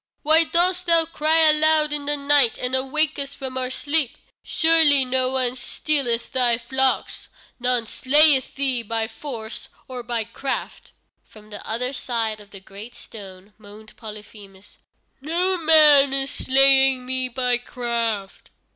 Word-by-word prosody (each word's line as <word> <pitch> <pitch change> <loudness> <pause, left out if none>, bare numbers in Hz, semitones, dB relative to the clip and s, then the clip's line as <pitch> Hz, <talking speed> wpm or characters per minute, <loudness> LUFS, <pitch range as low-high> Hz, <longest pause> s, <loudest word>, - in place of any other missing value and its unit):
"Why 320 +2 +4
dost 360 +2 0
thou 335 -1 +3
cry 320 0 +1
aloud 305 0 +3
in 290 -1 -4
the 295 0 0
night 280 -4 +2
and 250 0 -4
awake 285 +4 -1
us 280 0 -6
from 265 -2 -7
our 255 -1 -3
sleep? 285 0 -1 0.3
Surely 320 -5 +3
no 255 0 -1
one 255 -1 -2
stealeth 250 -2 -2
thy 245 -3 +1
flocks? 265 +2 -2 0.3
None 245 -1 0
slayeth 280 +3 +2
thee 265 -3 -1
by 225 0 -4
force 225 -2 -9 0.2
or 255 -1 -8
by 235 -1 -4
craft." 250 +5 -7 0.3
From 215 0 -19
the 205 - -10
other 250 +4 -3
side 225 -4 -4
of 205 -1 -16
the 200 - -13
great 200 +5 -13
stone 195 -1 -13
moaned 215 +1 -16
Polyphemus: 210 -2 -14 0.4
"Noman 315 -4 +3
is 270 0 -1
slaying 270 -1 +2
me 255 0 -3
by 250 0 -2
craft." 230 -5 -5
260 Hz, 140 wpm, -21 LUFS, 230-295 Hz, 0.4 s, Why